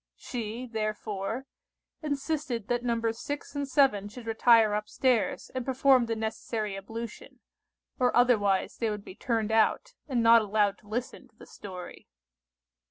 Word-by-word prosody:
She, 235 Hz, 0 st, -5 dB
therefore, 215 Hz, 0 st, -3 dB, 0.6 s
insisted 285 Hz, -6 st, -2 dB
that 240 Hz, 0 st, 0 dB
Nos. 230 Hz, -2 st, -1 dB
6 290 Hz, 0 st, -5 dB
and 285 Hz, -1 st, -2 dB
7 260 Hz, -8 st, +3 dB
should 235 Hz, +2 st, -10 dB
retire 225 Hz, -1 st, +5 dB
up 210 Hz, 0 st, -2 dB
stairs 250 Hz, -5 st, 0 dB
and 255 Hz, -1 st, -2 dB
perform 260 Hz, -1 st, +3 dB
the 225 Hz, -, -1 dB
necessary 220 Hz, -1 st, -3 dB
ablution, 225 Hz, +3 st, -8 dB, 0.6 s
or 250 Hz, -1 st, +2 dB
otherwise 205 Hz, -6 st, +3 dB
they 230 Hz, -, 0 dB
would 210 Hz, -1 st, -5 dB
be -, -, -9 dB
turned 225 Hz, 0 st, -1 dB
out, 225 Hz, -, +2 dB
and 250 Hz, -5 st, 0 dB
not 230 Hz, 0 st, +7 dB
allowed 205 Hz, -1 st, +1 dB
to 210 Hz, -, -22 dB
listen 235 Hz, +4 st, -4 dB
to -, -, -34 dB
the -, -, -14 dB
story. 185 Hz, -3 st, -10 dB
230 Hz, 150 wpm, -28 LUFS, 210-250 Hz, 0.6 s, not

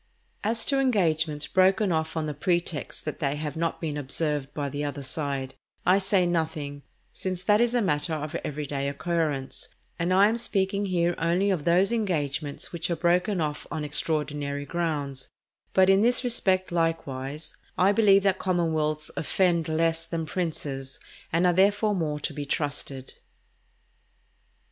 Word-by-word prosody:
As 225 Hz, +2 st, +1 dB
to 275 Hz, -1 st, +2 dB
engagements 160 Hz, -, +1 dB
broken 190 Hz, +3 st, +3 dB
off 160 Hz, 0 st, -1 dB
on 160 Hz, -, 0 dB
the 150 Hz, -, -3 dB
pretext 170 Hz, 0 st, -2 dB
that 155 Hz, -, -4 dB
they 140 Hz, -1 st, 0 dB
have 150 Hz, 0 st, -4 dB
not 165 Hz, 0 st, -1 dB
been 155 Hz, -3 st, -3 dB
observed 145 Hz, 0 st, -1 dB
by 145 Hz, -2 st, -3 dB
the 145 Hz, +1 st, -4 dB
other 145 Hz, -1 st, -4 dB
side, 135 Hz, -1 st, -3 dB, 0.3 s
I 185 Hz, +2 st, +5 dB
say 190 Hz, -1 st, +3 dB
nothing, 160 Hz, -4 st, -2 dB, 0.3 s
since 185 Hz, -1 st, -4 dB
that 210 Hz, +2 st, +4 dB
is 240 Hz, 0 st, +2 dB
a 240 Hz, -, +3 dB
matter 160 Hz, -2 st, 0 dB
of 150 Hz, +1 st, -5 dB
everyday 140 Hz, -1 st, -3 dB
occurrence, 145 Hz, -1 st, -2 dB, 0.3 s
and 170 Hz, +2 st, 0 dB
I 195 Hz, +2 st, +6 dB
am 225 Hz, +2 st, 0 dB
speaking 200 Hz, -3 st, 0 dB
here 175 Hz, -2 st, +1 dB
only 180 Hz, +4 st, +2 dB
of 170 Hz, -6 st, -1 dB
those 180 Hz, +5 st, +4 dB
engagements 155 Hz, -, -2 dB
which 170 Hz, 0 st, -2 dB
are 170 Hz, -, +1 dB
broken 180 Hz, +3 st, +1 dB
off 150 Hz, -2 st, -2 dB
on 155 Hz, -, -3 dB
extraordinary 145 Hz, -1 st, -2 dB
grounds; 145 Hz, -4 st, -3 dB, 0.4 s
but 190 Hz, 0 st, +5 dB
in 195 Hz, +1 st, +5 dB
this 245 Hz, +3 st, +4 dB
respect, 190 Hz, -7 st, +1 dB
likewise, 155 Hz, -3 st, -2 dB, 0.2 s
I 190 Hz, +2 st, +5 dB
believe 200 Hz, -2 st, +5 dB
that 195 Hz, -2 st, +2 dB
commonwealths 160 Hz, -4 st, 0 dB
offend 170 Hz, -1 st, +1 dB
less 165 Hz, +1 st, +1 dB
than 165 Hz, -1 st, -3 dB
princes, 145 Hz, -6 st, -4 dB, 0.3 s
and 170 Hz, +2 st, +2 dB
are 180 Hz, -, +4 dB
therefore 205 Hz, +3 st, +3 dB
more 155 Hz, -5 st, -1 dB
to -, -, -2 dB
be 145 Hz, -2 st, -5 dB
trusted. 140 Hz, -2 st, -2 dB
165 Hz, 160 wpm, -27 LUFS, 150-185 Hz, 0.4 s, I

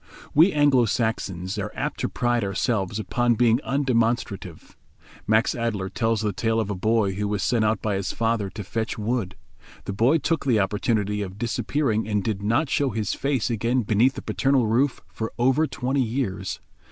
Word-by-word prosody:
We 165 Hz, +6 st, +6 dB
Anglo 145 Hz, -6 st, +4 dB
Saxons 100 Hz, -4 st, -2 dB
are 105 Hz, +1 st, -3 dB
apt -, -, -3 dB
to -, -, -1 dB
pride 120 Hz, -2 st, 0 dB
ourselves 100 Hz, 0 st, -1 dB
upon 120 Hz, +3 st, +1 dB
being 120 Hz, 0 st, +3 dB
undemonstrative. 115 Hz, -, -1 dB, 0.5 s
Max 110 Hz, +2 st, +3 dB
Adeler 110 Hz, -5 st, -2 dB
tells 115 Hz, +2 st, 0 dB
the 105 Hz, -2 st, -1 dB
tale 115 Hz, +3 st, 0 dB
of 105 Hz, -2 st, -1 dB
a -, -, -2 dB
boy 110 Hz, +1 st, +1 dB
who 105 Hz, +2 st, -2 dB
was 100 Hz, -2 st, -1 dB
sent 120 Hz, -2 st, +2 dB
out 105 Hz, -1 st, 0 dB
by 105 Hz, -, 0 dB
his 95 Hz, -, -2 dB
father 115 Hz, -3 st, 0 dB
to 105 Hz, +2 st, -7 dB
fetch 110 Hz, +5 st, -3 dB
wood. 110 Hz, -2 st, -2 dB, 0.5 s
The 100 Hz, -, -3 dB
boy 120 Hz, +10 st, +3 dB
took 165 Hz, 0 st, -1 dB
the 120 Hz, -6 st, +2 dB
opportunity 105 Hz, +1 st, 0 dB
of 95 Hz, -1 st, -6 dB
disappearing 115 Hz, 0 st, -1 dB
and 105 Hz, -2 st, 0 dB
did 105 Hz, -2 st, -2 dB
not 115 Hz, +9 st, +1 dB
show 140 Hz, +1 st, +1 dB
his 110 Hz, -3 st, -2 dB
face 135 Hz, -3 st, -1 dB
again 115 Hz, +3 st, 0 dB
beneath 115 Hz, +6 st, +2 dB
the -, -, -7 dB
paternal 135 Hz, -3 st, +1 dB
roof 120 Hz, +5 st, +1 dB
for 110 Hz, 0 st, -4 dB
over 130 Hz, +6 st, +3 dB
twenty 130 Hz, +1 st, -1 dB
years. 110 Hz, -6 st, -2 dB
115 Hz, 180 wpm, -24 LUFS, 105-125 Hz, 0.5 s, We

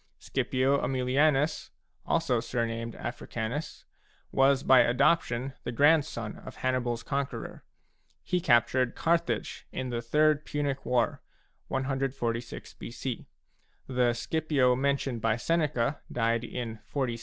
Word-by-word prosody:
Scipio 135 Hz, +2 st, 0 dB
Aemilianus, 135 Hz, +3 st, +1 dB, 0.4 s
also 160 Hz, -8 st, +2 dB
surnamed 115 Hz, -1 st, -3 dB
Africanus, 120 Hz, +8 st, -5 dB, 0.5 s
was 135 Hz, 0 st, +4 dB
by 130 Hz, -1 st, +7 dB
adop 140 Hz, +8 st, +4 dB
tion 125 Hz, +3 st, -4 dB
the -, -, -3 dB
grandson 140 Hz, -5 st, +2 dB
of -, -, -11 dB
HannibaFs 125 Hz, -2 st, -1 dB
conqueror. 140 Hz, -1 st, -4 dB, 0.6 s
He 180 Hz, -1 st, 0 dB
captured 120 Hz, -4 st, +3 dB
Carthage 170 Hz, 0 st, 0 dB
in 130 Hz, -1 st, -4 dB
the 120 Hz, -1 st, -2 dB
Third 150 Hz, +5 st, +3 dB
Punic 145 Hz, -3 st, -3 dB
War, 125 Hz, -2 st, +1 dB, 0.5 s
146 130 Hz, -3 st, -2 dB
b.c. 120 Hz, +1 st, -6 dB, 0.6 s
The 125 Hz, -2 st, +2 dB
Scipio 140 Hz, -2 st, +1 dB
mentioned 135 Hz, -2 st, 0 dB
by 115 Hz, -1 st, +2 dB
Seneca 145 Hz, -1 st, 0 dB
died 115 Hz, 0 st, +1 dB
in 120 Hz, -2 st, -5 dB
46 -, -, -30 dB
b.c. 125 Hz, -5 st, -1 dB
130 Hz, 115 wpm, -29 LUFS, 120-140 Hz, 0.6 s, by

